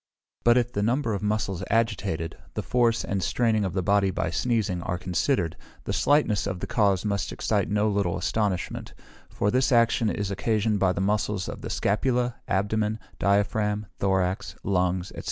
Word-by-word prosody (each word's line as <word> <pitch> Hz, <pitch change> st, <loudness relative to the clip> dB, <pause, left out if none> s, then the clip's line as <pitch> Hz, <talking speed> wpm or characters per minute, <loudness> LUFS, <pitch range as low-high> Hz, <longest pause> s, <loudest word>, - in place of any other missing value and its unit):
But 120 Hz, +1 st, +5 dB
if 120 Hz, -1 st, +1 dB
the 100 Hz, -, -2 dB
number 115 Hz, +2 st, +1 dB
of 100 Hz, -, -2 dB
muscles 105 Hz, -3 st, -1 dB
agitated, 105 Hz, -7 st, 0 dB, 0.2 s
the -, -, -2 dB
force 120 Hz, -2 st, +2 dB
and 100 Hz, -1 st, -1 dB
straining 110 Hz, +1 st, +1 dB
of 95 Hz, -3 st, -2 dB
the 95 Hz, -1 st, -1 dB
body 100 Hz, +1 st, +3 dB
by 85 Hz, -3 st, -2 dB
sneezing, 105 Hz, -4 st, 0 dB
are 90 Hz, +1 st, -2 dB
considered; 90 Hz, -, 0 dB, 0.3 s
the -, -, -3 dB
slightness 140 Hz, -9 st, +2 dB
of 95 Hz, -3 st, -3 dB
the -, -, -3 dB
cause 100 Hz, -3 st, +1 dB
must 100 Hz, -2 st, -1 dB
excite -, -, 0 dB
no 105 Hz, +1 st, +2 dB
little 100 Hz, -4 st, 0 dB
astonishment; 95 Hz, 0 st, -2 dB, 0.3 s
for 105 Hz, -, 0 dB
this 130 Hz, 0 st, +2 dB
action 115 Hz, -2 st, +3 dB
is 100 Hz, -1 st, -2 dB
occasioned 105 Hz, +1 st, 0 dB
by 95 Hz, -2 st, +3 dB
the 95 Hz, -, -2 dB
muscles 100 Hz, -1 st, 0 dB
of -, -, -6 dB
the -, -, -5 dB
scapula, 120 Hz, +3 st, 0 dB
abdomen, 105 Hz, +2 st, 0 dB, 0.2 s
diaphragm, 105 Hz, +1 st, +1 dB
thorax, 95 Hz, -1 st, 0 dB
lungs, 90 Hz, -1 st, 0 dB
&c. -, -, -9 dB
105 Hz, 170 wpm, -26 LUFS, 95-115 Hz, 0.3 s, But